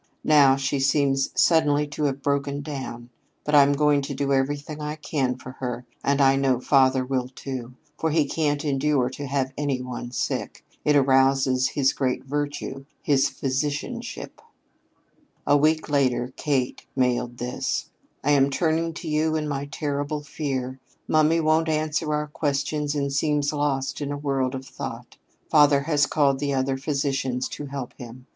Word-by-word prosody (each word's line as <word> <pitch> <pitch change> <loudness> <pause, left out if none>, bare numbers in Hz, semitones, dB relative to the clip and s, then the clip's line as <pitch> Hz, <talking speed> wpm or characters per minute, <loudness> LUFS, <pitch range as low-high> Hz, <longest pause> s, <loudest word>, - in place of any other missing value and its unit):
Now 145 -3 +6
she 135 +1 -1
seems 135 0 +2
suddenly 150 -3 +4
to 150 0 -2
have 140 -1 -2
broken 140 0 0
down. 130 -5 -6 0.3
But 150 - -3
I'm 145 -1 +6
going 145 0 +3
to 140 0 -5
do 140 +1 0
everything 145 +3 -1
I 150 0 -3
can 140 -4 -1
for 130 - -9
her, 125 -1 -4 0.2
and 140 0 +1
I 135 -1 +5
know 135 -2 +2
father 130 -1 +3
will, 130 -1 -1
too; 130 -1 -7 0.2
for 160 - +1
he 155 -1 +2
can't 145 0 -1
endure 135 -2 +1
to 140 +2 -6
have 135 -1 -1
any 145 -3 -1
one 125 -1 -6
sick. 125 - -3 0.2
It 150 - +3
arouses 135 -1 +3
his 135 -2 +1
great 130 -1 -1
virtue, 145 -1 -4 0.2
his 140 -2 +3
physicianship." 135 - -4 1.0
A 145 - +4
week 155 +2 +2
later 130 -3 +1
Kate 135 -4 -1
mailed 125 -2 0
this: 125 +1 -3 0.3
"I 145 - +2
am 140 -1 +4
turning 165 +3 0
to 170 - -7
you 155 +1 +1
in 155 -1 -1
my 140 -1 -2
terrible 145 +1 -3
fear. 135 -3 -4 0.3
Mummy 155 +1 +3
won't 160 0 +2
answer 155 0 0
our 150 0 0
questions 150 0 -1
and 140 -1 -1
seems 145 0 +1
lost 145 -2 -1
in 145 0 -3
a 145 - -3
world 135 -2 -1
of 130 0 -6
thought. 130 - -8 0.3
Father 145 -2 +6
has 150 0 +2
called 140 -3 +2
in 140 -1 0
other 135 0 0
physicians 135 -2 -1
to 145 - -6
help 135 -3 -6
him. 125 +1 -10
140 Hz, 165 wpm, -24 LUFS, 135-150 Hz, 1.0 s, Now